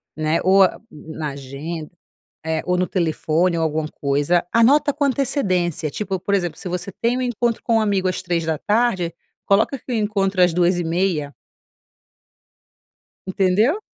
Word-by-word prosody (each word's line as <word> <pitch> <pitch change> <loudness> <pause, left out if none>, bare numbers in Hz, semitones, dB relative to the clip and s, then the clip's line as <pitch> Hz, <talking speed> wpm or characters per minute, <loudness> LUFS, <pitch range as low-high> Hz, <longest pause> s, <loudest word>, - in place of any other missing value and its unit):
né? 155 +1 0
Ou 190 +1 +6
a 185 - +1
na 155 0 -6
agenda 140 +4 -7 0.5
é, 160 -1 -1
ou 180 0 +1
no 180 0 +1
telefone 170 0 0
ou 165 - 0
alguma 155 -1 -1
coisa, 145 +6 0
anota 280 +6 +4
com 290 - -2
antecedência, 190 - 0
tipo, 195 +3 -3
por 200 +3 -2
exemplo, 175 -4 -2
se 185 - -6
você 180 +2 -4
tem 235 +2 0
um - - -2
encontro 240 -2 -1
com 230 - +1
um - - +3
amigo 200 -3 +1
às 185 - -2
15h, 175 +3 0 0.3
coloca 210 +7 +2
que 255 - -9
o - - 0
encontro 200 -3 0
às 180 -2 +4
14h30. 175 -3 0 1.9
Entendeu? 195 - +2
180 Hz, 150 wpm, -21 LUFS, 160-210 Hz, 1.9 s, Ou